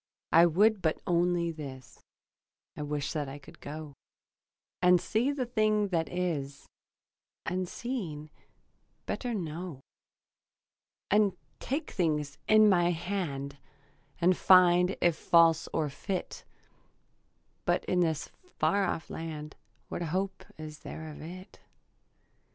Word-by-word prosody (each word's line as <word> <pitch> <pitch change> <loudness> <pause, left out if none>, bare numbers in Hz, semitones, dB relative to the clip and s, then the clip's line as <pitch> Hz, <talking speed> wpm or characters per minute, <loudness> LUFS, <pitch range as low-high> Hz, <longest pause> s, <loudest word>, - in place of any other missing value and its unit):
I 170 +1 +7
would 205 +5 +3
but 160 - +1
only 175 -1 +2
this: 130 -7 -9 0.8
I - - -6
wish 145 -1 -2
that 150 -3 -2
I 135 - -7
could 140 - -15
go 150 0 -7 0.9
And 180 0 +6
see 230 +10 +1
the 275 -3 -2
thing 215 -3 +1
that 165 -3 0
is, 155 -6 -3 0.8
And, 185 0 -2
seeing, 170 - -5 0.7
better 245 -3 -3
know; 170 -4 -5 1.3
And 205 -1 +3 0.2
take 285 +5 -3
things 150 -5 -1
in 215 0 +7
my 175 -3 +4
hand 160 -6 -3 0.6
And 180 +1 +4
find 180 0 +5
if 175 -2 +4
false 165 -1 +4
or 155 -2 0
fit; 185 +6 -5 1.2
But - - +1
in 180 - +1
this 160 -4 0
far 200 - 0
off 165 - -3
land 155 -2 -6 0.3
What - - -5
hope 190 +4 -2
is 155 -1 -8
there 160 0 -7
of 150 - -10
it? 185 +5 -10
170 Hz, 120 wpm, -30 LUFS, 155-190 Hz, 1.3 s, I